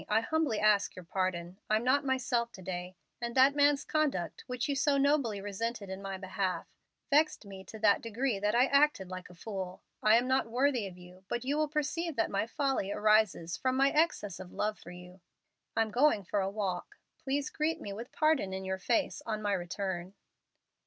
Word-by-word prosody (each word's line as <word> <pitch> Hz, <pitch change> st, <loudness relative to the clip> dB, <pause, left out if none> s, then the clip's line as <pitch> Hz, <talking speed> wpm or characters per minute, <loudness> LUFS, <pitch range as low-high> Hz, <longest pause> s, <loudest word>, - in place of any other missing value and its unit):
I 215 Hz, +1 st, +3 dB
humbly 295 Hz, -3 st, 0 dB
ask 210 Hz, -1 st, +3 dB
your 185 Hz, -, -10 dB
pardon. 185 Hz, 0 st, -2 dB
I'm 215 Hz, +1 st, +2 dB
not 265 Hz, +3 st, +3 dB
myself 250 Hz, -3 st, 0 dB
to 190 Hz, -, -11 dB
day, 180 Hz, 0 st, -5 dB, 0.3 s
and 235 Hz, 0 st, -3 dB
that 265 Hz, +2 st, +6 dB
man's 285 Hz, -1 st, +3 dB
conduct, 290 Hz, -, -1 dB
which 250 Hz, 0 st, -2 dB
you 285 Hz, -, 0 dB
so 280 Hz, 0 st, +2 dB
nobly 275 Hz, -7 st, +2 dB
resented 205 Hz, +1 st, -4 dB
in 190 Hz, +1 st, -6 dB
my 195 Hz, -1 st, -4 dB
behalf, 185 Hz, -2 st, -2 dB, 0.5 s
vexed 300 Hz, -4 st, +3 dB
me 195 Hz, -1 st, -9 dB
to 220 Hz, -, -9 dB
that 210 Hz, -2 st, +4 dB
degree 230 Hz, 0 st, -1 dB
that 210 Hz, +2 st, +1 dB
I 245 Hz, +2 st, +6 dB
acted 280 Hz, -9 st, +3 dB
like 185 Hz, 0 st, -7 dB
a 180 Hz, -, -14 dB
fool. 190 Hz, -1 st, -6 dB, 0.2 s
I 215 Hz, +1 st, +6 dB
am 245 Hz, +2 st, +1 dB
not 260 Hz, -1 st, +2 dB
worthy 250 Hz, -2 st, +1 dB
of 180 Hz, -2 st, -11 dB
you, 180 Hz, +1 st, -14 dB
but 240 Hz, +1 st, -2 dB
you 280 Hz, +2 st, 0 dB
will 305 Hz, 0 st, +1 dB
perceive 305 Hz, +2 st, -2 dB
that 225 Hz, -, 0 dB
my 200 Hz, +2 st, 0 dB
folly 270 Hz, -7 st, -1 dB
arises 215 Hz, -6 st, +2 dB
from 260 Hz, 0 st, 0 dB
my 275 Hz, +1 st, +4 dB
excess 300 Hz, -, +1 dB
of 185 Hz, -1 st, -9 dB
love 210 Hz, 0 st, -2 dB
for -, -, -12 dB
you. 180 Hz, +1 st, -12 dB, 0.5 s
I'm 225 Hz, -1 st, +1 dB
going 250 Hz, -3 st, +3 dB
for 200 Hz, +3 st, -1 dB
a 190 Hz, -, 0 dB
walk. 195 Hz, -3 st, -3 dB, 0.2 s
Please 280 Hz, +2 st, -2 dB
greet 315 Hz, +2 st, -1 dB
me 200 Hz, -, -6 dB
with 230 Hz, +4 st, -8 dB
pardon 310 Hz, -11 st, +2 dB
in 190 Hz, 0 st, -5 dB
your 190 Hz, 0 st, -2 dB
face 230 Hz, +4 st, 0 dB
on 215 Hz, -1 st, -1 dB
my 205 Hz, -1 st, 0 dB
return." 185 Hz, 0 st, -3 dB
215 Hz, 200 wpm, -31 LUFS, 190-270 Hz, 0.5 s, that